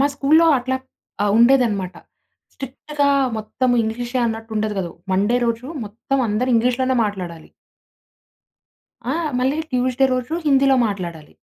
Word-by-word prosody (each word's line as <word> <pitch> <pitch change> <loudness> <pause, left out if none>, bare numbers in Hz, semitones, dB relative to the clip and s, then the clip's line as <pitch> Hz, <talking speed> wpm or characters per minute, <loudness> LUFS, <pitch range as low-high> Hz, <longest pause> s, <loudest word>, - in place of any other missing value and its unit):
మా 280 - +4
స్కూల్‌లో 310 +4 +4
అట్లా 260 +1 -2 0.5
ఆహ్, 205 -1 +2
ఉండేదన్నమాట. 230 -7 +3 0.6
స్ట్రిక్ట్‌గా 280 +2 -3 0.3
మొత్తం 245 +4 -1
ఇంగ్లీషే 240 +3 -3
అన్నట్టు 225 0 -5
ఉండేది 215 0 -1
కాదు. 175 -3 -3 0.2
మండే 205 +6 +2
రోజు 230 +1 -2 0.2
మొత్తం 230 +6 -3
అందరు 225 +5 0
ఇంగ్లీష్‌లోనే 250 +3 +1
మాట్లాడాలి. 180 -6 -6 1.6
ఆ! - - -1 0.2
మళ్ళీ 265 +5 0
ట్యూస్‌డే 255 +1 +1
రోజు 255 +5 -2
హిందీలో 275 -1 +4
మాట్లాడాలి. 170 -6 -6
245 Hz, 120 wpm, -20 LUFS, 210-265 Hz, 1.6 s, మా